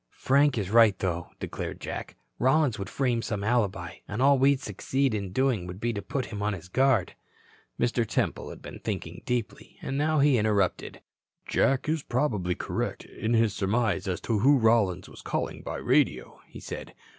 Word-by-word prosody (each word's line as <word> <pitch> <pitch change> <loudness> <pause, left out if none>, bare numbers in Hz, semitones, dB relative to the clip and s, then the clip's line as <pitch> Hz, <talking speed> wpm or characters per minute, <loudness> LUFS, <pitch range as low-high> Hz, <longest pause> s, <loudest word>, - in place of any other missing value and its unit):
"Frank 140 0 +3
is 100 -3 -2
right, 110 -4 +6
though," 85 -2 -2
declared - - -5
Jack. - - -6 0.2
"Rollins 130 -2 +3
would 100 - -5
frame 125 -4 0
some 105 -4 -3
alibi, 100 -6 0
and 105 - -4
all 140 +1 +5
we'd 135 0 +4
succeed 130 +5 -1
in 100 -3 -3
doing 120 -6 +1
would 90 +1 -7
be 120 +2 -1
to 100 - -4
put 130 +5 -3
him 100 - -4
on 105 0 0
his 90 -2 -9
guard." 130 -4 +2 0.7
Mr. 120 0 +1
Temple 110 - -1
had - - -11
been - - -9
thinking - - -5
deeply. 120 -5 -3
Now 150 +3 0
he 140 -4 +4
interrupted. 105 -3 0 0.4
"Jack 135 +1 +1
is 155 0 0
probably 110 -10 -1
correct - - -3
in 115 +2 -2
his 115 -2 +3
surmise 105 -1 0
as 90 -2 -1
to 110 -3 0
who 140 +6 +5
Rollins 110 -6 +2
was - - -12
calling - - -3
by - - -5
radio," - - +1
he - - -11
said. - - -8
115 Hz, 180 wpm, -27 LUFS, 100-130 Hz, 0.7 s, right